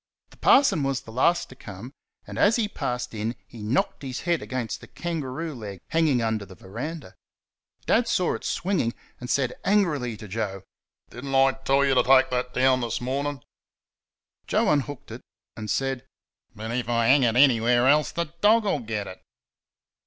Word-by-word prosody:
The - - -18
parson 270 - +5
was 135 -1 -1
the 115 - -12
last 170 +9 +2
to 130 - -12
come, 110 +1 -9 0.3
and - - -7
as 210 +3 +5
he 230 -3 +1
passed 125 - -4
in 110 +2 -3
he 115 - -12
knocked 110 +6 0
his 130 -2 -5
head 170 -2 0
against 130 -3 -4
the - - -12
kangaroo 160 -2 -4
leg 105 -6 -8
hanging 155 -7 +2
under 110 -2 -1
the 95 -1 -12
verandah. 125 - -7 0.7
Dad 235 - +3
saw 180 - +1
it - - -6
swinging, 170 -11 -1 0.2
and 125 - -7
said 130 -3 +1
angrily 155 - +1
to 110 0 -10
Joe: 100 -2 -4 0.5
"Did 120 - -9
n't 135 -1 -2
I 135 0 +5
tell 135 +1 +1
you 135 - +3
to 125 - +5
take 130 +1 +5
that 125 0 -1
down 130 0 +3
this 115 -2 -2
morning?" 135 +1 -3 1.0
Joe - - +2
unhooked 145 -2 -2
it - - -8 0.3
and 110 -1 -6
said: 135 +4 -1 0.5
"But 110 +2 -6
if 120 -1 -2
I 115 -1 +2
hang 135 +4 +5
it 120 -3 +2
anywhere 120 -2 +4
else 150 +2 +4
the 170 -2 -3
dog'll 210 -5 +4
get 110 -4 -4
it." 95 -1 -10
130 Hz, 180 wpm, -25 LUFS, 115-145 Hz, 1.0 s, parson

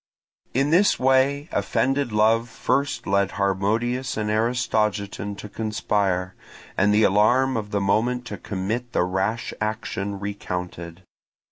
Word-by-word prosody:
In 135 +3 +2
this 190 +5 +4
way 135 +3 +2
offended 135 +6 0
love 110 +2 +3
first 140 +3 -1
led 100 -1 +1
Harmodius 110 +6 0
and 105 -1 -1
Aristogiton 105 -3 0
to 105 - -7
conspire, 100 -4 -1 0.4
and 100 +2 +3
the 105 +1 +4
alarm 120 +7 +3
of 105 -2 -3
the 100 -1 -1
moment 120 +5 +1
to 105 - -6
commit 110 +7 -4
the - - +2
rash 95 +5 -1
action 100 -2 -3
recounted. 90 -3 -5
105 Hz, 125 wpm, -24 LUFS, 100-120 Hz, 0.4 s, this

